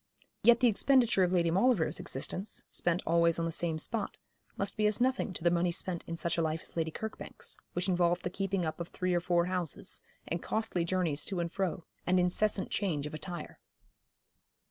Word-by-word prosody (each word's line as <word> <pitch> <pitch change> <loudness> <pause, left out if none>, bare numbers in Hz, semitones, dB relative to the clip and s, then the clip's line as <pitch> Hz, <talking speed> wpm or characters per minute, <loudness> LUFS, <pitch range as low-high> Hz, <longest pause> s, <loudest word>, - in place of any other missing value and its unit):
Yet 240 +1 +6
the 250 - +6
expenditure 240 -1 +4
of 180 -1 +3
Lady 170 -2 +3
Maulevrier's 195 -1 +2
existence, 190 +9 -2
spent 175 +1 0
always 170 0 +3
on 165 - 0
the 165 - -1
same 165 -1 0
spot, 210 +7 -1 0.4
must 200 0 -1
be 215 0 +3
as 210 +1 +2
nothing 255 -4 +1
to 170 - -6
the 170 - +4
money 175 +1 +2
spent 175 0 -3
in 165 - -4
such 170 0 0
a - - +3
life 160 0 -1
as - - -7
Lady 165 -1 0
Kirkbank's, 220 +7 -6
which 175 +2 -1
involved 175 -1 +2
the 180 - -2
keeping 195 -1 -1
up 155 - -3
of 170 - -4
three 185 0 -1
or 175 - +2
four 175 -1 +2
houses, 180 -4 -3 0.3
and 170 0 -2
costly 220 -6 -1
journeys 170 -4 0
to 190 -3 -2
and 170 -1 -2
fro, 190 -2 -2 0.2
and 185 +1 +4
incessant 190 +3 +1
change 165 -9 0
of 150 - -6
attire. 175 +3 -6
175 Hz, 200 wpm, -31 LUFS, 170-195 Hz, 0.4 s, Yet